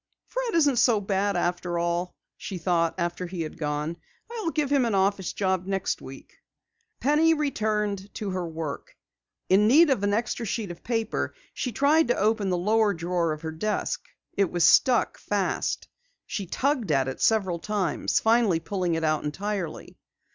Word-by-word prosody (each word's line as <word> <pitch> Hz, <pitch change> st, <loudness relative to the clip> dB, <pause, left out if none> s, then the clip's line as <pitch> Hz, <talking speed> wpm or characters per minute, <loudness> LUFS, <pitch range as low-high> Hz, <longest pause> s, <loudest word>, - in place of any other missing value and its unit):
"Fred -, -, -3 dB
isn't 290 Hz, -6 st, +3 dB
so 235 Hz, -2 st, +4 dB
bad 200 Hz, 0 st, 0 dB
after 175 Hz, 0 st, -1 dB
all," 175 Hz, +1 st, -1 dB, 0.2 s
she 190 Hz, -, -6 dB
thought 170 Hz, -1 st, +1 dB
after 175 Hz, 0 st, -2 dB
he 175 Hz, -2 st, -4 dB
had 155 Hz, -, -7 dB
gone. 150 Hz, +2 st, -2 dB, 0.3 s
"I'll 445 Hz, -7 st, -2 dB
give 300 Hz, -3 st, -1 dB
him 280 Hz, -3 st, +4 dB
an 230 Hz, -4 st, 0 dB
office 195 Hz, -1 st, +1 dB
job 190 Hz, -2 st, -1 dB
next 195 Hz, -1 st, -1 dB
week." 135 Hz, 0 st, -12 dB, 0.6 s
Penny 315 Hz, +4 st, +4 dB
returned 210 Hz, -8 st, -1 dB
to 205 Hz, -3 st, -3 dB
her 185 Hz, -2 st, -2 dB
work. 160 Hz, -3 st, -6 dB, 0.5 s
In 200 Hz, +3 st, +4 dB
need 300 Hz, +6 st, +6 dB
of 255 Hz, -, +1 dB
an 205 Hz, 0 st, +1 dB
extra 225 Hz, +2 st, -1 dB
sheet 215 Hz, -3 st, -3 dB
of 170 Hz, -, -11 dB
paper, 225 Hz, -2 st, -2 dB, 0.2 s
she 250 Hz, -, -3 dB
tried 285 Hz, +6 st, +3 dB
to 245 Hz, -, +1 dB
open 210 Hz, -1 st, +1 dB
the 180 Hz, -, +1 dB
lower 210 Hz, +2 st, +2 dB
drawer 170 Hz, 0 st, -1 dB
of 155 Hz, +1 st, -5 dB
her 160 Hz, -, -3 dB
desk. 210 Hz, +7 st, -2 dB, 0.3 s
It 195 Hz, -3 st, +1 dB
was 175 Hz, -1 st, +1 dB
stuck 240 Hz, +8 st, +4 dB
fast. 200 Hz, -3 st, -1 dB, 0.4 s
She 200 Hz, -4 st, -4 dB
tugged 255 Hz, -, 0 dB
at 135 Hz, -2 st, +2 dB
it 135 Hz, -, -5 dB
several 190 Hz, -6 st, +2 dB
times, 200 Hz, -5 st, 0 dB
finally 225 Hz, -6 st, +3 dB
pulling 175 Hz, 0 st, -1 dB
it 165 Hz, -, -2 dB
out 155 Hz, -1 st, +1 dB
entirely. 185 Hz, +2 st, -4 dB
195 Hz, 170 wpm, -26 LUFS, 170-225 Hz, 0.6 s, need